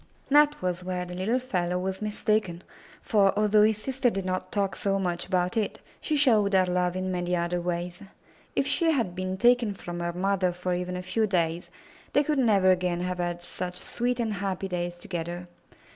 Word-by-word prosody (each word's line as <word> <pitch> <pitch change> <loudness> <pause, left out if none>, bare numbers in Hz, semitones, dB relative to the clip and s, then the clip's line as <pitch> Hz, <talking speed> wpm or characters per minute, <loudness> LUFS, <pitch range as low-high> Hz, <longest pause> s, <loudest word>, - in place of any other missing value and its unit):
That 295 +1 +5
was 180 0 -1
where 180 0 -3
the 180 - -8
little 190 +7 0
fellow 180 -9 -1
was 190 +2 -3
mistaken, 210 -4 -1 0.4
for, 200 -3 +3
although 210 0 +4
his 215 0 +4
sister 260 +2 0
did 195 -4 -3
not 185 0 -3
talk 200 -2 0
so 195 -1 0
much 175 -3 -2
about 180 +1 0
it, 215 -3 -1 0.2
she 310 - 0
showed 220 -8 +4
her 190 -1 +5
love 180 0 0
in 185 0 -2
many 180 0 -1
other 175 0 -1
ways. 175 +1 -3 0.6
If - - +2
she 325 +4 +2
had 240 - +1
been 185 +1 -3
taken 240 -1 +3
from 175 -2 -6
her 170 0 -1
mother 185 0 +1
for 180 +1 -2
even 180 0 -2
a 180 - -5
few 215 +4 0
days, 170 -3 0 0.4
they 290 - +4
could 295 -1 0
never 200 -6 +4
again 180 -1 0
have 180 0 -3
had 175 0 -2
such 180 0 -5
sweet 245 +5 -2
and 225 -2 0
happy 195 -1 -3
days 175 -1 -3
together. 175 0 -5
185 Hz, 195 wpm, -27 LUFS, 180-215 Hz, 0.6 s, That